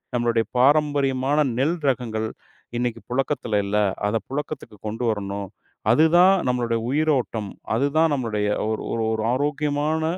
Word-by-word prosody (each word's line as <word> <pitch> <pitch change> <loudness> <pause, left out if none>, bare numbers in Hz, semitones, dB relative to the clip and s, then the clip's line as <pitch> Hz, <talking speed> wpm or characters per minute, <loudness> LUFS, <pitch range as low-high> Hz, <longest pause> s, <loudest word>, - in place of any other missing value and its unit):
நம்மளுடைய 120 -1 +1
பாரம்பரியமான 145 0 +3
நெல் 155 +7 +1
ரகங்கள் 115 -4 -2 0.5
இன்னைக்கு 120 -2 -2
புழக்கத்துல 125 -4 0
இல்ல, 100 +1 0 0.3
அத 105 - -1
புழக்கத்துக்கு 135 -5 -5
கொண்டுவரணும். 100 -4 -2 0.4
அதுதான் 175 +6 +6 0.2
நம்மளுடைய 120 -2 0
உயிரோட்டம், 130 -9 0 0.3
அதுதான் 145 +5 +2
நம்மளுடைய 110 -5 -1 0.2
ஒரு 110 - -2
ஒரு 115 - -1
ஒரு 110 -1 -1
ஆரோக்கியமான 150 +3 0
125 Hz, 110 wpm, -23 LUFS, 110-145 Hz, 0.5 s, அதுதான்